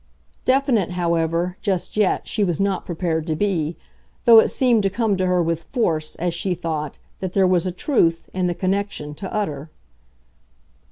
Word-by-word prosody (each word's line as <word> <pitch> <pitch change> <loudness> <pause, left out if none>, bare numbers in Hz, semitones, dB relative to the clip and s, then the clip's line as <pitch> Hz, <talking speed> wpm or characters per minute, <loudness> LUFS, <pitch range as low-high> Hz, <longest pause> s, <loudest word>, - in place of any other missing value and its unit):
Definite, 255 - +2
however, 170 +1 0
just 190 -4 -2
yet, 210 -3 +1
she 210 - 0
was 175 -5 0
not 195 -1 -1
prepared 165 -2 -2
to 160 - 0
be, 170 -4 -1 0.5
though 230 -1 +9
it - - +4
seemed 245 -4 +2
to 195 - +1
come 215 0 0
to 185 0 0
her 180 -1 +2
with 165 0 -1
force, 165 - -1
as 175 0 -2
she 180 +2 -1
thought, 155 -4 -4 0.2
that 185 -1 -4
there 195 -1 +4
was 180 -1 +2
a - - -1
truth, 170 - +1
in 185 -1 0
the 175 - -1
connection, 190 -6 -2
to 190 +5 -7
utter. 155 -8 -3
180 Hz, 175 wpm, -22 LUFS, 165-200 Hz, 0.5 s, though